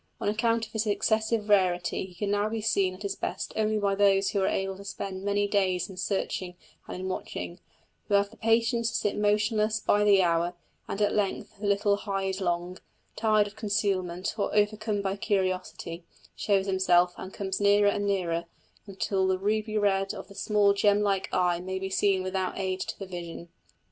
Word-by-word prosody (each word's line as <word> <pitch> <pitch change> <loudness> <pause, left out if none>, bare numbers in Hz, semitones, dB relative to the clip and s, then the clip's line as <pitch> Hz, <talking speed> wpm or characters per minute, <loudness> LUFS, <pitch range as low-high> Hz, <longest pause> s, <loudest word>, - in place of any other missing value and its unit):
On - - -3
account 230 +2 +1
of - - -17
his 220 0 -1
excessive 220 +1 +1
rarity 185 -4 +2
he 180 - -16
can 200 +2 -2
now 205 +1 +1
be 225 +1 -3
seen 195 -3 +1
at 185 - -11
his 200 -1 -2
best - - -4
only 215 0 +1
by 200 -1 +1
those 195 -1 +3
who 200 - 0
are 190 - +2
able 195 0 -1
to 200 - -10
spend 195 -1 -5
many 205 0 +1
days 190 -2 0
in - - -10
searching 185 -1 -2 0.3
and - - -6
in 185 - -3
watching, 185 -1 -5 0.5
who 205 - +2
have 200 0 +2
the - - -14
patience 230 +1 +2
to 225 - -6
sit 205 - 0
motionless 210 +1 +1
by 205 0 +2
the 200 -2 +5
hour; 170 +1 +1 0.3
and 210 - -1
at 205 - +2
length 200 -1 -2
the 210 - -2
little 200 0 +2
hideling, 190 -3 -2 0.4
tired 215 -1 +3
of 205 0 -9
concealment 195 -4 -1
or 200 - +1
overcome 210 0 +1
by 195 0 -1
curiosity, 185 -4 -2 0.3
shows 195 -2 +1
himself 180 -2 +3
and 190 - -8
comes 190 0 -3
nearer 205 0 +5
and 205 0 -1
nearer, 170 -4 0 0.4
until 190 -1 0
the 190 0 +2
ruby 215 +2 -1
red 195 -1 +1
of - - -9
the - - -11
small 200 0 +3
gem 205 +1 +3
like 195 -2 0
eye 180 -1 +2
may 190 +1 -4
been 190 0 -4
seen 190 -1 +2
without 185 0 -2
aid 190 -1 -2
to - - -4
the 195 - -6
vision. 175 -2 -7
200 Hz, 195 wpm, -28 LUFS, 185-210 Hz, 0.5 s, the